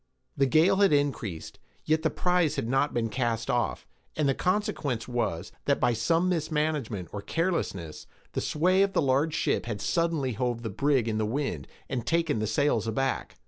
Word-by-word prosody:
The 135 - +3
gale 165 +8 +4
had 200 -1 +4
increased, 135 - -1 0.3
yet 155 +1 +2
the - - +2
prize 180 -4 +1
had - - -2
not 135 +4 +1
been 115 -1 0
cast 115 +1 -1
off, 120 -2 -1 0.3
and 150 -2 +1
the 135 - +3
consequence 150 - -1
was, 105 -8 -2
that 140 - +2
by 120 - +3
some 165 +10 +1
mismanagement 150 - -1
or 105 - -5
carelessness, 100 - -2 0.2
the - - -2
sway 185 +5 +2
of 195 0 +2
the - - +2
large 140 +4 +2
ship - - 0
had 105 -3 -3
suddenly 165 - 0
hove 120 0 -2
the 110 - -3
brig 135 +2 +1
in 110 -1 -1
the 110 - +1
wind, 110 - -2 0.2
and 125 -3 -3
taken 165 -6 +1
the 110 - -1
sails 115 -1 +1
aback. 135 +5 -1
135 Hz, 185 wpm, -28 LUFS, 115-160 Hz, 0.3 s, gale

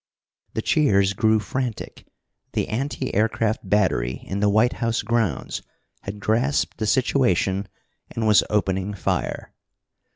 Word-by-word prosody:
The 110 - -1
cheers 100 - +3
grew 110 +2 +3
frantic. 120 +2 -5 0.5
The - - -1
anti 130 +3 -3
aircraft 110 -1 0
battery 70 -12 +1
in 95 - -3
the 105 0 +3
White 110 +4 +3
House 115 -1 0
grounds 110 - -1 0.4
had 100 +1 -7
grasped 120 +7 0
the 110 - -1
situation, 100 -7 +1 0.4
and 115 - -3
was 105 -1 +5
opening 95 -1 0
fire. 90 - -2
105 Hz, 125 wpm, -23 LUFS, 100-115 Hz, 0.5 s, was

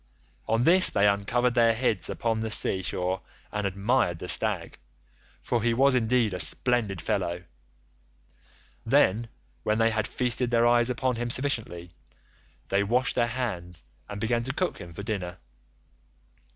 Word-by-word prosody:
On 115 +2 +1
this 185 +6 +6
they 100 +1 +2
uncovered 115 +5 +1
their 115 -2 +3
heads 115 -5 -1
upon 115 -1 -2
the 110 0 -3
sea 95 -3 +3
shore 90 0 -3 0.3
and 105 -1 -2
admired 100 -1 0
the - - -8
stag, - - -1 0.6
for 120 - -1
he 115 +1 +1
was 135 +2 +4
indeed 120 -3 +1
a 90 - -4
splendid 105 +4 +1
fellow. 90 -1 -2 1.4
Then, 115 -3 +2 0.3
when 105 0 0
they 115 0 +3
had 110 -1 -1
feasted 125 0 0
their 120 -1 +2
eyes 120 0 +3
upon 125 -1 -1
him 120 0 -3
sufficiently, 115 -10 -1 0.8
they 100 - +2
washed 125 +5 +1
their 120 - +1
hands 95 -9 -5 0.3
and 100 - -6
began 115 +2 0
to 130 - -3
cook 180 +4 -2
him 85 - -10
for 90 +5 -8
dinner. 95 -5 -4
115 Hz, 150 wpm, -26 LUFS, 100-120 Hz, 1.4 s, this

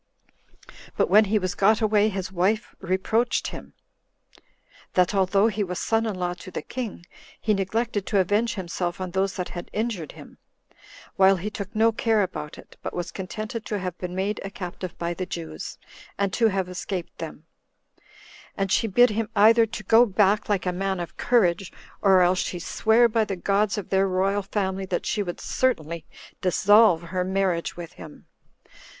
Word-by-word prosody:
But - - +1
when 215 +2 +7
he 210 +2 +1
was 185 -3 -1
got 215 +2 +3
away, 215 -1 +3
his 190 -2 -4
wife 190 +4 0
reproached 195 +6 0
him, - - -10 1.2
that 180 +1 +3
although 195 +1 +3
he 215 -2 +1
was 180 -2 -4
son 225 +4 0
in 210 - -2
law 180 -1 -2
to 180 +2 -11
the - - -5
king, 230 -8 -6 0.3
he 215 - +1
neglected 205 +1 -1
to 205 - +1
avenge 205 +5 +1
himself 175 -2 -3
on 185 -1 -4
those 190 +1 0
that 180 -2 -4
had 175 -1 -7
injured 210 -8 -3
him, - - -14 0.8
while 195 0 +6
he 195 +4 -4
took 200 +1 -7
no 225 +1 +4
care 220 -1 +2
about 150 -5 -6
it, - - -15
but - - -5
was 175 -1 -4
contented 215 +4 -5
to 210 - -2
have 185 -3 -4
been 180 0 -5
made 195 +3 -2
a 195 - -5
captive 180 -2 -7
by 170 0 -2
the 185 +1 -5
Jews, 80 -1 -6 0.4
and 200 -2 0
to 230 - +3
have 190 -3 -1
escaped 180 0 -5
them; - - -7 1.1
and 195 -1 -1
she 225 - +2
bid 245 +3 +5
him 215 0 -2
either 225 +3 +6
to 220 -1 -7
go 225 +5 +5
back 205 +1 +2
like 200 -3 0
a 180 - 0
man 190 +1 -2
of 175 - -6
courage, 195 -6 +2 0.3
or 190 -2 +5
else 180 +1 +3
she 180 - -2
sware 220 +7 +3
by 225 -1 +1
the 200 -2 -3
gods 200 +3 +1
of 205 - -5
their 195 0 +3
royal 195 +2 +1
family 190 -1 -2
that 180 -2 -2
she 210 - 0
would 175 -3 -4
certainly 170 -10 -1 0.4
dissolve 190 -1 +5
her 180 +2 -2
marriage 185 -3 -1
with 175 0 -8
him. 155 -1 -12
195 Hz, 180 wpm, -25 LUFS, 180-215 Hz, 1.2 s, when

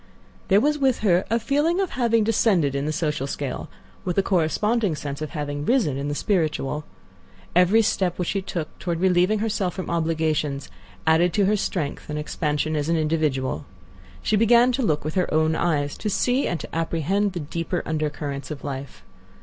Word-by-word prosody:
There 200 -1 +5
was 295 +5 +1
with 265 -3 +2
her 185 -3 +3
a 230 +2 +2
feeling 295 - +1
of 385 -3 0
having 230 -3 +2
descended 200 - +2
in 140 +1 -1
the - - 0
social 150 -3 -1
scale, 140 -1 -4 0.3
with 180 -1 -2
a 195 - +4
corresponding 195 +3 +1
sense 145 -1 -5
of 155 - -3
having 145 -2 -4
risen 195 - +2
in 140 +1 -3
the 145 - -2
spiritual. 155 -6 -1 0.7
Every 185 +6 +5
step 185 -4 0
which 180 - -1
she 195 - 0
took 170 -4 -5
toward 170 -2 -2
relieving 185 +3 +3
herself 205 -4 -1
from 185 - -4
obligations 160 -4 -1 0.3
added 165 +2 +4
to 205 - +3
her 210 +2 +3
strength 165 -9 -3
and 150 - -3
expansion 150 0 -1
as 150 +1 -1
an 165 - +2
individual. 150 - 0 0.6
She 215 - +2
began 235 +3 +5
to 260 +2 -1
look 155 - 0
with 155 - -2
her 180 -2 0
own 155 +1 +2
eyes; 145 -5 0
to 215 - -2
see 250 +6 +1
and 170 - -2
to - - -8
apprehend 170 +5 0
the 175 - -3
deeper 165 +3 -3
undercurrents 150 -2 -3
of 150 -3 -7
life. 140 -1 -6
170 Hz, 185 wpm, -24 LUFS, 150-205 Hz, 0.7 s, There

